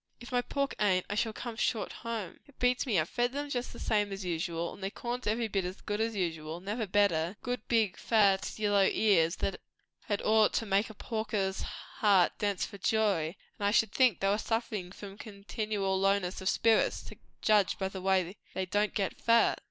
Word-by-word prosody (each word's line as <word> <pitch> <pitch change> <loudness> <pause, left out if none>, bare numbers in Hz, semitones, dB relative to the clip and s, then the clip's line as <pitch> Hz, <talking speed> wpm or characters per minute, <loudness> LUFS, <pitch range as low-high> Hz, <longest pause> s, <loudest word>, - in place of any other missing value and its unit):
"If 240 - -11
my 245 -1 +2
pork 275 +2 -2
ain't, 185 -3 +2
I - - 0
shall 220 +2 0
come 235 +1 -6
short 220 -1 -1
home. 225 -6 -5
It 285 - -21
beats 250 +2 +1
me! 210 -8 +3
I've 155 - 0
fed 245 +5 -1
'em 290 0 -3
just 245 -2 -2
the - - -11
same 205 -2 0
as 195 -1 -5
usual, 170 -1 -2
and - - -13
the 195 - -2
corn's 245 +3 -5
every 225 +2 +1
bit 195 -3 -1
as 180 +1 -5
good 210 +1 -3
as 225 0 -1
usual, 165 -3 -3
never 210 +4 -3
better; 185 -2 +2
good 245 -3 -3
big 220 -5 +2
fat 200 -4 +3
yellow 205 -2 +2
ears, 180 -6 +3
that 195 - -3 0.4
had 205 -2 -2
ought 215 0 +4
to 225 - 0
make 200 +2 +1
a 220 - -11
porker's 215 -4 -2
heart 195 -5 +1
dance 205 -2 0
for 200 - -10
joy; 195 -6 +1 0.2
and 200 - +1
I - - +4
should 220 0 +3
think 255 -7 +3
they 195 - +2
were 205 +2 +2
sufferin' 215 -5 -2
from 200 +1 -10
continual 200 -2 -2
lowness 195 -1 +1
o' - - -8
spirits, 225 +3 +2
to - - -11 0.3
judge 210 -3 +3
by 190 - -1
the 190 -1 -7
way 190 -1 +1 0.2
they 190 - -1
don't 205 +3 0
get 195 -3 -2
fat. 230 0 +4
205 Hz, 205 wpm, -31 LUFS, 190-225 Hz, 0.4 s, ought